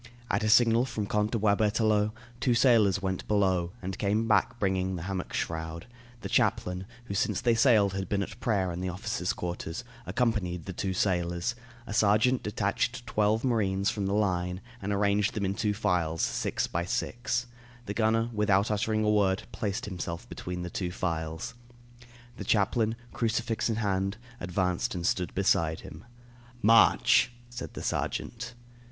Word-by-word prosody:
At - - +1
a 110 - +1
signal 120 +1 +5
from 115 -5 -3
Count 105 +1 0
de 115 - -1
Boisberthelot, 105 0 +2 0.3
two 125 -1 +2
sailors 110 -6 +4
went 95 -1 -2
below 95 -4 +2
and 95 +1 -4
came 105 +2 +1
back 110 +2 +2
bringing 95 -2 0
the 85 - -5
hammock 95 -1 -4
shroud; 80 0 -3 0.4
the - - -4
chaplain, 90 +1 0 0.2
who 100 - -5
since 100 0 0
they 120 - +3
sailed 110 -5 +4
had 95 -1 -3
been 100 -1 +1
at - - -9
prayer 95 -6 0
in 85 - -5
the 95 - -2
officers' 90 +2 -2
quarters, 85 +3 -4 0.2
accompanied 100 -9 0
the 95 - -5
two 95 +1 -2
sailors; 90 +1 0 0.3
a 110 - -6
sergeant 110 +4 +3
detached 110 +4 -1
twelve 105 +2 +1
marines 100 -6 +1
from 100 -2 -2
the 100 - 0
line 90 -3 0 0.2
and 100 +1 -2
arranged 100 +1 +2
them 105 -2 -1
in 95 - 0
two 105 +1 0
files, 90 -6 0
six - - 0
by 85 - -2
six; 120 +6 -1 0.4
the 100 - -3
gunner, 115 +1 +2
without 105 -1 +2
uttering 110 +1 +1
a 105 - +3
word, 100 -2 +2
placed 100 -1 -3
himself 85 -3 -5
between 90 0 -5
the 90 - -5
two 90 -3 -3
files. 80 -3 -3 0.8
The - - -5
chaplain, 110 +2 +2 0.2
crucifix 115 0 0
in 115 - 0
hand, 100 -2 -1 0.2
advanced 90 0 -1
and 85 -1 -3
stood 90 -1 0
beside 85 -5 +2
him. 80 +2 -11 0.6
"March," 115 +2 +5 0.2
said 120 - -7
the - - -5
sergeant. 120 0 -3
100 Hz, 165 wpm, -29 LUFS, 90-110 Hz, 0.8 s, signal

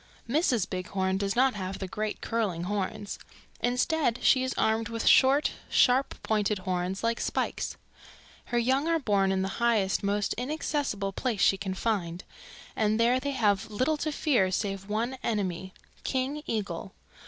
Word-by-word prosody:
"Mrs. 245 - +2
Bighorn 190 +1 -2
does 200 -1 -1
not 260 +1 +4
have 190 -1 -4
the 190 - -5
great 215 +3 -3
curling 205 -7 -1
horns. 205 +2 -3 0.4
Instead 250 +1 +1
she 260 - +5
is 260 - -2
armed 220 0 +1
with 230 -1 -3
short, 275 +3 +5 0.2
sharp 260 +2 +3
pointed 210 -1 +1
horns, 185 +1 -2
like 230 0 +1
spikes. - - -2 0.7
Her 240 - -2
young 260 +5 +2
are 335 0 +3
born 200 -9 +2
in 190 0 +1
the - - -1
highest, 220 -5 +2
most 200 0 0
inaccessible 265 -7 -2
place 225 -2 -2
she - - +5
can 190 -1 -4
find, 180 -6 -2 0.5
and 215 0 +1
there 240 +2 +4
they 285 - -3
have 210 -5 +1
little 255 +9 +1
to 310 +1 -2
fear 260 -10 +2
save 195 +1 -3
one 235 +5 -2
enemy, 190 -4 -2 0.3
King 270 +3 -1
Eagle. 200 -3 -3
215 Hz, 155 wpm, -28 LUFS, 195-255 Hz, 0.7 s, she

